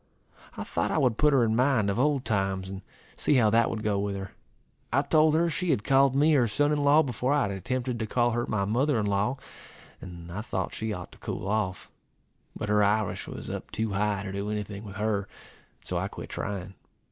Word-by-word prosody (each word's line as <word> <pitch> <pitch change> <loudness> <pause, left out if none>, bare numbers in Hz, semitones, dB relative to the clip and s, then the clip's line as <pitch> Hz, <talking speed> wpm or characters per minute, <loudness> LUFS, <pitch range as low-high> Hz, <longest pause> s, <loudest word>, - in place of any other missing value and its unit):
I - - -3
thought - - -1
I - - 0
would 125 -4 +2
put 150 0 +5
her 135 -4 +4
in 110 -1 +1
mind 125 -4 +3
of 100 - -2
old 140 -1 +2
times, 95 -3 -1
and 95 0 -6 0.3
see - - +2
how 110 -5 +4
that 115 +1 +4
would 110 -1 -4
go 105 -2 +1
with 100 0 -2
her. 95 0 -6 0.6
I 135 +4 +3
told 155 +1 +4
her 170 +1 +3
she 175 +2 -2
had 105 - +1
called 135 0 +4
me 150 +3 +4
her 125 -5 +4
son 145 +8 +1
in 150 -1 +1
law 145 +2 +5
before 125 0 -1
I 145 - +3
had 100 - -1
attempted 125 +5 -3
to 110 - -2
call 120 +1 +2
her 120 +1 -1
my 100 -2 0
mother 125 +5 +1
in 105 - 0
law 100 +6 0 0.6
and 85 -1 -9
I 100 +4 -4
thought 95 -4 -3
she 110 0 -3
ought 90 -4 -6
to - - -16
cool 95 - -5
off. 100 -3 -1 0.7
But 105 - -4
her 105 0 +3
Irish 105 0 0
was - - -7
up - - -6
too 110 -1 -2
high 100 0 0
to 100 - -5
do 100 +1 -3
any 105 0 -1
thing 100 0 -9
with 100 -1 -9
her, 105 0 0
and 100 - -5 0.6
so - - -1
I - - -2
quit - - -9
trying. 95 -2 -5
110 Hz, 235 wpm, -27 LUFS, 100-135 Hz, 0.7 s, put